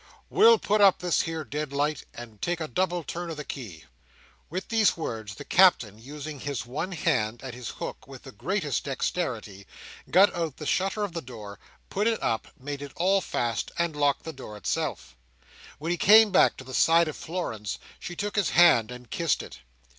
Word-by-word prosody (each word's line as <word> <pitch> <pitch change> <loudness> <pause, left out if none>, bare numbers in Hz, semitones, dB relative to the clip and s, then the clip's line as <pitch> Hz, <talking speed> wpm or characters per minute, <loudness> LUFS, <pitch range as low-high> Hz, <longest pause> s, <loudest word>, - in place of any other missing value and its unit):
We'll 455 +2 +7
put 210 - +1
up 195 -2 +7
this 180 -2 +1
here 160 -1 -3
deadlight, 145 0 -2
and 115 -4 -11
take 175 0 -1
a 160 - -3
double 175 +5 -1
turn 175 +2 -5
on 165 - -4
the 150 - -6
key!" 110 - -8 0.7
With 185 +4 -5
these 220 -5 +3
words, 110 -9 -5
the - - -9
Captain, 120 - +4
using 145 +4 -8
his 140 -4 -4
one 150 +10 -4
hand 125 -9 0
and 130 -2 -6
his 125 -1 -7
hook - - -7
with - - -11
the - - -10
greatest - - -2
dexterity, 100 0 -3 0.4
got 195 +3 +6
out 165 -5 -3
the 150 - -7
shutter 195 +6 0
of 200 -4 -3
the 165 - -3
door, 105 -6 -10 0.3
put 205 +3 +1
it 225 -1 +1
up, 110 - -1
made 140 +2 -6
it 145 -1 -8
all 190 +3 +2
fast, 115 - -2
and 170 -2 0
locked 145 -1 +1
the 160 - -6
door 120 -6 -9
itself. 65 -9 -3 0.6
When 160 +3 -3
he 175 - 0
came 215 +3 +7
back 185 - +4
to - - -9
the 130 0 -10
side 165 +4 +4
of 155 - -4
Florence, 135 - -4 0.2
she 175 - -7
took 205 +3 -3
his 205 -4 +2
hand, 160 -11 +5
and 125 0 -10
kissed - - 0
it. - - -11
155 Hz, 195 wpm, -27 LUFS, 125-180 Hz, 0.7 s, We'll